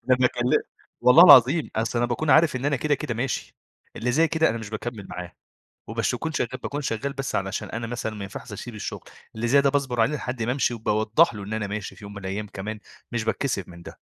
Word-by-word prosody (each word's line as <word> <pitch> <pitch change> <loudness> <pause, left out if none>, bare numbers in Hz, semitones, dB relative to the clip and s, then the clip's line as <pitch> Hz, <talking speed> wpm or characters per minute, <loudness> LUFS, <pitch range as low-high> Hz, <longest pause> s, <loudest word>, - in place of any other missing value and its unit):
ده 130 - +4
أنا 130 - +6
كل 120 0 0 0.5
والله 160 +8 +8
العظيم 145 +1 +7
أصل 115 +2 0
أنا 120 - +2
باكون 145 +5 -1
عارف 155 -1 +5
إن 130 - -5
أنا 145 -1 +2
كده 145 +3 +1
كده 135 -4 -4
ماشي، 125 +3 -3 0.4
اللي 125 +1 -1
زي 160 +4 +3
كده 160 0 +2
أنا 115 - -2
مش 110 -2 -8
باكمّل 110 -2 -6
معاه، 90 0 -7 0.6
وباش 115 +2 -1
اكون 160 +7 -3
شغال 130 -3 -2
باكون 145 +1 -3
شغال 135 +2 -3
بس 135 -1 -4
علشان 95 +1 -3
أنا 115 0 -4
مثلًا 110 -2 -4
ما 100 - -6
ينفعش 100 +1 -8
اسيب 115 +3 -7
الشغل، 105 - -6 0.3
اللي 115 +2 -2
زي 140 +4 +5
ده 140 - +3
باصبر 135 -4 0
عليه 150 +7 +2
لحد 125 -3 -4
ما 120 - 0
امشي، 130 -1 +1
وباوضّح 110 +6 +2
له 100 -1 -7
إن 105 +2 -6
أنا 110 -2 -2
ماشي 100 0 -5
في 105 - -12
يوم 100 - -9
من 100 - -7
الأيام 100 +3 -4
كمان 105 +2 -6 0.3
مش 120 -2 -1
باتكّسف 110 -3 -2
من 85 -1 -12
ده. - - -8
120 Hz, 240 wpm, -25 LUFS, 110-135 Hz, 0.6 s, والله